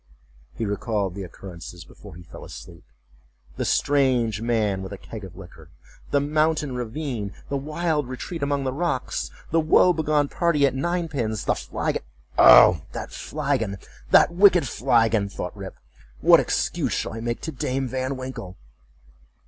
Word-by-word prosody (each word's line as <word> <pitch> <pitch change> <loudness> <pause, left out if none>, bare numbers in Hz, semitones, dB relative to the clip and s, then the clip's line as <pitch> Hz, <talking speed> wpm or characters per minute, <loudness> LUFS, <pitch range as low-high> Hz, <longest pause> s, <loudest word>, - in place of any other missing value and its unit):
He 115 - -3
recalled 105 -2 -2
the 100 - -7
occurrences 90 -2 -10
before - - -14
he 90 - -11
fell 85 - -12
asleep. 85 - -11 0.7
The - - -2
strange 125 -7 +1
man 110 -5 0
with 95 +1 -7
a 100 - -6
keg 110 +2 -9
of 95 - -10
liquor—the 85 - -6
mountain 155 0 0
ravine—the 125 -1 -4
wild 150 -1 -2
retreat 160 +6 -6
among 140 0 0
the 130 -1 -2
rocks—the 165 +1 -2
woe 165 +3 +5
begone 150 -2 +1
party 155 -2 +2
at 135 - +1
ninepins—the 140 - -1
flagon—"Oh! 60 +5 +4
that - - -6
flagon! 135 -9 -2 0.3
that - - +5
wicked 180 -5 +5
flagon!" 115 -6 +2
thought - - -6
Rip—"what - - 0
excuse - - -1
shall - - -2
I 115 - -6
make 120 +1 -3
to 160 - -4
Dame 130 -1 -2
Van 130 +2 -3
Winkle!" 130 -8 -7
130 Hz, 135 wpm, -24 LUFS, 100-145 Hz, 0.7 s, woe